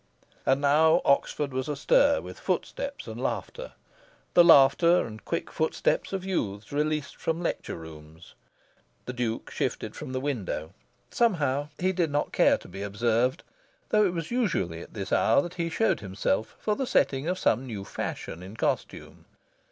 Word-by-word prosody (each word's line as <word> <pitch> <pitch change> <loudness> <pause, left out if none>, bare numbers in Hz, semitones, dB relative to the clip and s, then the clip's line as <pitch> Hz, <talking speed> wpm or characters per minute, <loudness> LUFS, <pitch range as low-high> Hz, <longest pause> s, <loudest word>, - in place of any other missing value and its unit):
And 135 - +4
now 155 +3 +5
Oxford 140 0 +1
was 130 +3 -2
astir 280 - +3
with - - -10
footsteps 280 0 -3
and - - -7
laughter - - -4 0.6
the 175 - +8
laughter 170 +2 +6
and 110 -1 -9
quick 170 - -3
footsteps 160 0 0
of 190 -1 -3
youths 105 - -3
released 150 0 -1
from 165 0 -2
lecture - - -3
rooms. 80 0 -12 0.7
The 125 - -5
Duke 120 -2 -3
shifted - - -3
from - - -7
the 130 - -2
window. 100 - -3 0.4
Somehow, 145 - +1
he 185 +1 +1
did 175 -3 +1
not 145 +1 -1
care - - +4
to - - -14
be 95 +2 -8
observed, 115 - 0 0.5
though 210 0 +4
it 185 -4 +1
was 165 +2 -4
usually 175 - 0
at - - -12
this 95 -3 -4
hour 115 - +4
that 175 - -7
he 170 -2 -2
showed 225 +7 +1
himself 100 +1 -2
for 210 - -1
the 265 +1 -2
setting 135 - +1
of 180 +1 0
some 130 -3 +1
new 105 -5 -6
fashion 85 -2 -5
in 95 +4 -10
costume. - - -3
140 Hz, 165 wpm, -27 LUFS, 110-170 Hz, 0.7 s, the